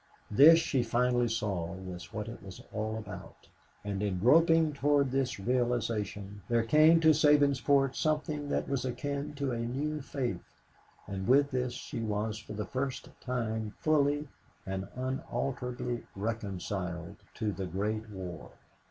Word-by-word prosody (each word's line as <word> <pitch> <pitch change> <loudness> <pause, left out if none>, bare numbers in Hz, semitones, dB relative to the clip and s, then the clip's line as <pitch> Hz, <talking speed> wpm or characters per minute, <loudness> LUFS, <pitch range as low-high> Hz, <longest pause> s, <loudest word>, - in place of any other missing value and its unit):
This, 150 +10 +9
she 145 -5 +1
finally 120 +1 +2
saw, 100 -6 -2
was 90 -2 -8
what 105 0 -4
it 115 - -8
was 95 -2 -10
all 110 +1 -2
about; 105 -2 -9 0.4
and 100 -1 -3
in 100 -3 -1
groping 160 - +5
toward 140 -1 +2
this 130 -4 0
realization 110 -4 -1
there 115 -1 +3
came 155 +7 +6
to 160 - +6
Sabinsport 140 -2 +4
something 150 -1 -1
that - - -1
was 140 -3 -1
akin 140 +3 -3
to 140 -2 -1
a 120 - -2
new 145 +6 -2
faith, 125 -9 -3 0.6
and 95 -1 -5
with 140 +2 +4
this 125 -1 -1
she - - -6
was 110 0 -2
for 105 - -9
the 105 0 -3
first 130 +5 -3
time 110 -4 -2
fully 145 -1 +2 0.4
and 95 0 -4
unalterably 125 -1 -3
reconciled 95 -4 -4 0.2
to 105 -1 -1
the 95 -1 -4
Great 105 +5 -2
War. 90 -5 -7
120 Hz, 145 wpm, -31 LUFS, 105-140 Hz, 0.6 s, This